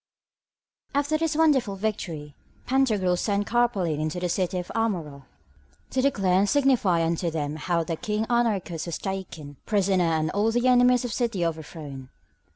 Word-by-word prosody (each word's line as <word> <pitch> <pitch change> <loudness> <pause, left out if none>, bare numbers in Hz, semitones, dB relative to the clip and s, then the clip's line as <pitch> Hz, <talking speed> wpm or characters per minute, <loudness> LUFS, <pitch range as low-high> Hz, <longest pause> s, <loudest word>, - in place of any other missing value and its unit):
After 290 +2 +1
this 325 -1 0
wonderful 280 -10 +3
victory, 170 -8 -4 0.3
Pantagruel 220 -9 +2
sent 205 -1 0
Carpalin 200 -11 +1
unto 155 +3 -2
the 180 0 -2
city 185 +1 -1
of 180 - -3
the - - -7
Amaurots 165 -12 -2 0.7
to 260 - +1
declare 195 -9 +2
and 200 +1 +2
signify 245 - +3
unto 170 +1 0
them 150 -2 -3
how 170 +1 0
the 165 0 -3
King 210 +4 -2
Anarchus 205 -9 0
was 170 - -3
taken 165 -7 -6
prisoner 195 -3 +2
and 160 -1 0
all 210 +3 +1
the 240 +2 +1
enemies 250 0 +4
of 240 - -3
the - - -3
city 230 -8 0
overthrown. 150 -5 -6
190 Hz, 165 wpm, -25 LUFS, 165-240 Hz, 0.7 s, enemies